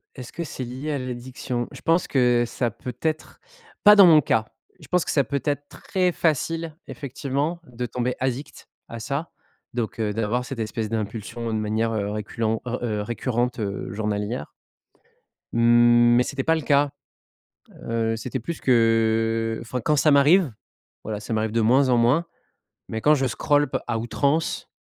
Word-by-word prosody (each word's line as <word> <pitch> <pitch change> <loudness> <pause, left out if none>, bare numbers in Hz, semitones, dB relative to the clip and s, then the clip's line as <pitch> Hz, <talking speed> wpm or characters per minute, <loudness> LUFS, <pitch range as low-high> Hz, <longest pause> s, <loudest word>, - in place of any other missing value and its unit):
est-ce 125 -3 -9
que 170 - -4
c'est 135 -4 -6
lié 130 +5 -5
à 145 - -1
l'addiction? 125 -1 -4
Je - - -11
pense 165 +2 +2
que, 125 -3 +3
ça 120 0 -2
peut 125 +3 -8
être 155 -1 -3 0.4
pas 210 0 +9
dans 200 -2 +9
mon 155 -3 +7
cas. 110 -3 +1 0.3
Je - - -14
pense 180 -2 +2
que - - -1
ça 140 - +3
peut 140 0 -3
être 145 -1 -1
très 185 -2 -1
facile, 165 0 -1
effectivement, 140 +4 -3
de 125 -2 -5
tomber 125 +1 -2
addict 130 +2 -4 0.2
à 115 - -7
ça. 140 +7 -4 0.4
Donc 120 -1 -3
heu, 105 -2 0
d'avoir 115 +3 -1
cette 130 -3 -6
espèce 110 0 -3
d'impulsion 115 +1 -4
de - - 0
manière, 110 +2 -1
heu, 105 -2 -1
reculent, 110 +1 -2
heu, 115 -3 -2
récurrente, 120 +3 -2
heu, 100 -3 -4
journalière 105 -3 -3 1.0
mmh, 120 0 +5
mais 125 - +4
c'était 135 +1 -3
pas 160 +3 +3
le 160 - -2
cas, 145 0 +2 1.0
heu, 115 -1 0
c'était 125 +3 -4
plus 165 +8 -5
qu'enfin 115 0 +1
quand 150 - +2
ça 150 +2 +4
m'arrive. 145 +2 +5 0.5
Voilà, 105 -1 -4
ça 105 - -6
m'arrive 110 0 0
de 115 - +1
moins 130 +5 +4
en 125 - +4
moins. 125 +9 +3 0.6
Mais 110 - -4
quand 150 +6 +5
je 135 -2 0
scroll 145 +4 +1
p - - 0
à 115 -2 -1
outrance, 140 +8 -1
120 Hz, 170 wpm, -24 LUFS, 115-140 Hz, 1.0 s, pas